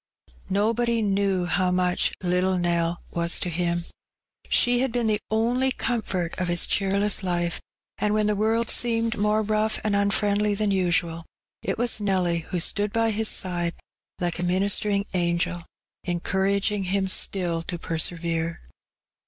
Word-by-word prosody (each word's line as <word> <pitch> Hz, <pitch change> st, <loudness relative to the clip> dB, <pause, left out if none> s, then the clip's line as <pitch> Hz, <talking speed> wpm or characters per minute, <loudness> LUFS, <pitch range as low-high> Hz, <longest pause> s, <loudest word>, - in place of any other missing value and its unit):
Nobody 230 Hz, +3 st, +1 dB
knew 195 Hz, -2 st, +1 dB
how 180 Hz, +1 st, +1 dB
much 180 Hz, 0 st, +1 dB
'^little 180 Hz, +1 st, +2 dB
Nell" 170 Hz, 0 st, 0 dB
was 170 Hz, 0 st, +1 dB
to 180 Hz, -, -2 dB
him: 170 Hz, 0 st, -1 dB, 0.7 s
she 245 Hz, 0 st, +4 dB
had 260 Hz, -1 st, 0 dB
been 240 Hz, -1 st, -1 dB
the 215 Hz, -1 st, +2 dB
only 240 Hz, +4 st, +1 dB
comfort 200 Hz, -9 st, -2 dB
of 180 Hz, -, -1 dB
his 175 Hz, -1 st, +3 dB
cheerless 200 Hz, +1 st, +1 dB
life, 175 Hz, -2 st, -2 dB, 0.4 s
and 210 Hz, -, +1 dB
when 215 Hz, 0 st, +2 dB
the 210 Hz, 0 st, +1 dB
world 220 Hz, +2 st, +1 dB
seemed 230 Hz, -1 st, +1 dB
more 210 Hz, +1 st, +1 dB
rough 215 Hz, +1 st, 0 dB
and 210 Hz, -1 st, +1 dB
unfriendly 205 Hz, +1 st, +2 dB
than 210 Hz, 0 st, 0 dB
usual, 175 Hz, -3 st, 0 dB, 0.4 s
it -, -, -2 dB
was 235 Hz, -2 st, 0 dB
Nelly 185 Hz, -4 st, +1 dB
who 175 Hz, +2 st, -4 dB
stood 205 Hz, +4 st, +1 dB
by 225 Hz, 0 st, +1 dB
his 220 Hz, +1 st, +1 dB
side 175 Hz, -2 st, 0 dB, 0.4 s
like 175 Hz, -1 st, -2 dB
a -, -, -2 dB
minis 190 Hz, +3 st, +2 dB
tering 200 Hz, -1 st, 0 dB
angel, 170 Hz, -1 st, -1 dB, 0.4 s
encouraging 195 Hz, +3 st, 0 dB
him 190 Hz, +1 st, 0 dB
still 180 Hz, -3 st, +1 dB
to 175 Hz, +1 st, -5 dB
persevere. 165 Hz, 0 st, -2 dB
195 Hz, 150 wpm, -25 LUFS, 175-215 Hz, 0.7 s, she